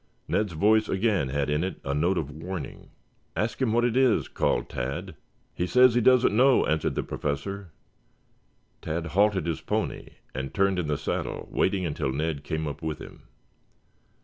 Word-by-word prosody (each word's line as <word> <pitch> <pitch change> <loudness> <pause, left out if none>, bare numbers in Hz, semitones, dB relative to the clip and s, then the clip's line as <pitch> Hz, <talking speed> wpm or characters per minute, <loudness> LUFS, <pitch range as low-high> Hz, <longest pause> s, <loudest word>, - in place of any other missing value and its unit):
Ned's 105 -4 0
voice 110 +6 +3
again 95 - +1
had 70 +1 -1
in 75 +2 0
it 95 - -4
a 70 - -1
note 85 +6 +1
of 75 -4 -2
warning. 80 0 -7 0.5
"Ask 110 +9 -2
him 125 -4 +2
what 120 +2 +3
it 120 -1 0
is," 130 -4 +3
called - - 0
Tad. 65 +3 -4 0.4
"He 90 - -2
says 125 +4 +6
he 120 - +3
doesn't 125 -2 +5
know," 130 +3 +5
answered 80 0 0
the - - -1
Professor. 90 +7 -4 1.1
Tad 80 +1 -3
halted 95 +2 +2
his 85 -1 -2
pony - - -2 0.3
and 65 +1 -5
turned 95 -2 +2
in 85 - -2
the 75 -1 0
saddle - - -3
waiting 95 -1 +1
until 75 -4 -2
Ned 75 +1 -2
came 80 +1 -3
up 70 - -6
with 80 -1 -3
him. - - -12
90 Hz, 175 wpm, -27 LUFS, 75-105 Hz, 1.1 s, says